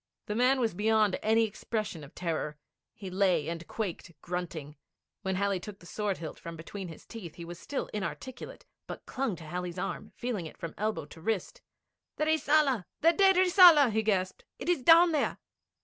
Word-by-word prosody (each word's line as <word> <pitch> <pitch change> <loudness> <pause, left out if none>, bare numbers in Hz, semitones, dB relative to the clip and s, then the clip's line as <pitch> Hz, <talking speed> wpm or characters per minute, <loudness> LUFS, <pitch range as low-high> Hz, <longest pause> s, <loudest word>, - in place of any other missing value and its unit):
The 210 - -3
man 250 +4 +3
was 230 -5 +1
beyond 215 0 +2
any 225 +1 +3
expression 215 -5 -4
of 140 - -13
terror. 160 -3 -3 0.4
He 195 -3 -8
lay 180 -5 +2
and 170 0 -5
quaked, 175 -7 -5
grunting. 170 -4 -5 0.5
When 190 -2 -1
Halley 200 0 0
took 200 +2 -9
the 175 - -17
sword 205 +1 -2
hilt 160 -2 -7
from 170 0 -7
between 180 +4 -7
his 160 - -11
teeth, 190 -9 -9
he 170 - -8
was 175 +1 -8
still 285 - -3
inarticulate, 215 +5 -6 0.2
but - - -8
clung 260 -7 -2
to 165 - -11
Halley's 180 +2 -5
arm, 195 +3 -4
feeling 225 -9 -3
it - - -13
from 170 - -6
elbow 215 -6 -2
to 160 +2 -14
wrist. 225 - -2 0.5
'The 305 - 0
Rissala! 300 - +3 0.2
The 330 +2 +5
dead 385 +2 +5
Rissala!' 355 - +7
he 220 +1 +1
gasped. 200 - -1
'It - - -5
is 350 -6 +2
down 335 +5 +7
there!' 300 -3 0
205 Hz, 185 wpm, -30 LUFS, 175-255 Hz, 0.5 s, Rissala